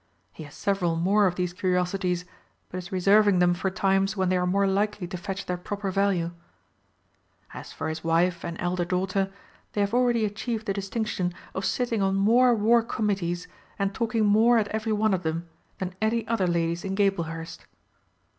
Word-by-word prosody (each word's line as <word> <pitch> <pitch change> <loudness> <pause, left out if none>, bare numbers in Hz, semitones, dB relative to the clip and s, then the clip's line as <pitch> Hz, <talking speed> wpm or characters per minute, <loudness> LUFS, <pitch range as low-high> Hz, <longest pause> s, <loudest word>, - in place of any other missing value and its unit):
He - - -11
has 145 - -13
several 195 -5 0
more 195 +5 +3
of 180 - -1
these 180 -1 -2
curiosities, 180 0 0 0.4
but 185 - -5
is 175 -1 -9
reserving 200 +1 +4
them 175 0 +4
for 185 +2 -1
times 195 +1 +1
when 185 -1 +1
they 185 - +2
are 180 0 0
more 200 +2 +2
likely 200 0 0
to 180 - -6
fetch 195 +2 -5
their 180 - -2
proper 200 +2 -4
value. 185 -3 +1 1.2
As - - -9
for - - -4
his 160 0 -4
wife 170 +1 +1
and 170 0 -5
elder 175 0 -1
daughter, 190 +2 -1 0.4
they 205 - 0
have 200 +2 0
already 240 -2 +3
achieved 215 +2 -3
the 200 - 0
distinction 195 -3 -2 0.2
of 190 - -3
sitting 235 -4 0
on 195 0 +1
more 235 +5 +4
War 230 +2 +4
Committees, 195 -6 -2 0.3
and 195 0 -1
talking 225 -1 0
more 225 +4 +5
at 210 -2 +1
every 220 +1 -2
one 215 -1 +2
of 185 - 0
them, 165 +1 -3 0.3
than 185 -1 -4
any 225 +1 0
other 225 -5 +1
ladies 170 0 0
in 195 0 -3
Gablehurst. 170 -5 -2
195 Hz, 185 wpm, -26 LUFS, 180-210 Hz, 1.2 s, more